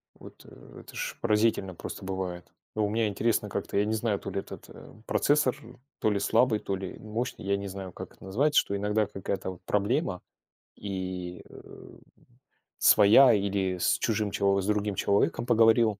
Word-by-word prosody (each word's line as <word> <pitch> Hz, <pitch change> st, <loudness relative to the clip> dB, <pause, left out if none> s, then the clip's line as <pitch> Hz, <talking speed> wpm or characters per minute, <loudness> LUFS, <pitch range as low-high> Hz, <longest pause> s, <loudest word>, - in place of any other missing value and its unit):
Вот, -, -, -14 dB
э, -, -, -14 dB
это -, -, -14 dB
ж -, -, -4 dB
поразительно 105 Hz, -4 st, +1 dB
просто 95 Hz, -, -8 dB
бывает. 95 Hz, -2 st, -4 dB, 0.3 s
А 110 Hz, -, -3 dB
у 105 Hz, -, +2 dB
меня 110 Hz, +1 st, +1 dB
интересно 105 Hz, +1 st, 0 dB
как-то, 100 Hz, 0 st, -4 dB
я 100 Hz, -, +3 dB
не 110 Hz, +1 st, -1 dB
знаю, 110 Hz, -2 st, 0 dB
то 100 Hz, -, -7 dB
ли 100 Hz, -, -2 dB
этот, -, -, -11 dB
эм, 110 Hz, -, -14 dB
процессор, 145 Hz, -3 st, +2 dB, 0.4 s
то 110 Hz, -, +2 dB
ли 100 Hz, -, +1 dB
слабый, 115 Hz, -1 st, +3 dB
то 95 Hz, -, -3 dB
ли 95 Hz, -1 st, -7 dB
мощный, 110 Hz, +1 st, -5 dB
я 100 Hz, 0 st, +1 dB
не 100 Hz, 0 st, -5 dB
знаю, 95 Hz, -1 st, -7 dB
как -, -, -9 dB
это -, -, -17 dB
называется, 140 Hz, +10 st, +3 dB
что 100 Hz, -, -3 dB
иногда 105 Hz, +1 st, 0 dB
какая-то 95 Hz, -1 st, -4 dB
вот 90 Hz, 0 st, -14 dB
проблема 105 Hz, -, 0 dB, 0.6 s
и, 95 Hz, -3 st, -5 dB
э, -, -, -14 dB, 0.8 s
своя, 110 Hz, +5 st, +7 dB
или 95 Hz, -2 st, 0 dB
с 90 Hz, -, +2 dB
чужим 105 Hz, -3 st, 0 dB
чело 100 Hz, 0 st, +2 dB
с -, -, -5 dB
другим 105 Hz, -1 st, 0 dB
человеком 100 Hz, +5 st, +1 dB
поговорил, 115 Hz, -3 st, +4 dB
100 Hz, 180 wpm, -28 LUFS, 95-110 Hz, 0.8 s, своя